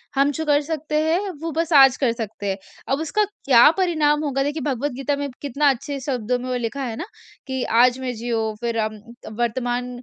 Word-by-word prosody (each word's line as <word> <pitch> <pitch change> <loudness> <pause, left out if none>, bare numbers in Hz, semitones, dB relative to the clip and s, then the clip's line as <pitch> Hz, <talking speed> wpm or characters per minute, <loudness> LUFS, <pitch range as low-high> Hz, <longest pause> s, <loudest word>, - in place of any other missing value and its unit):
हम 275 +1 +3
जो 320 +3 -3
कर 290 -1 +3
सकते 305 0 -4
हैं 340 +6 0
वो 330 0 -3
बस 330 +2 -2
आज 270 -3 +8
कर 260 -4 +2
सकते 220 -3 -5
हैं। 190 - -1 0.3
अब 270 - +1
उसका 320 +7 +1 0.2
क्या 250 -1 +7
परिणाम 310 -5 +2
होगा? 275 -2 0
देखिए 295 +2 -2
भगवद 285 0 -1
गीता 275 +2 -1
में 285 0 -3
कितना 285 +1 +2
अच्छे 275 +2 -2
शब्दों 250 -3 -1
में 250 - -6
वो 255 - -1
लिखा 245 +3 -3
है 235 -4 -4
ना, 320 - -5 0.4
कि 260 -1 -2
आज 245 +2 +4
मैं 255 -1 -3
जियो 225 -1 -2
फिर 235 -1 -2
अम 215 0 -2 0.4
वर्तमान 245 +1 -1
270 Hz, 210 wpm, -22 LUFS, 240-295 Hz, 0.4 s, आज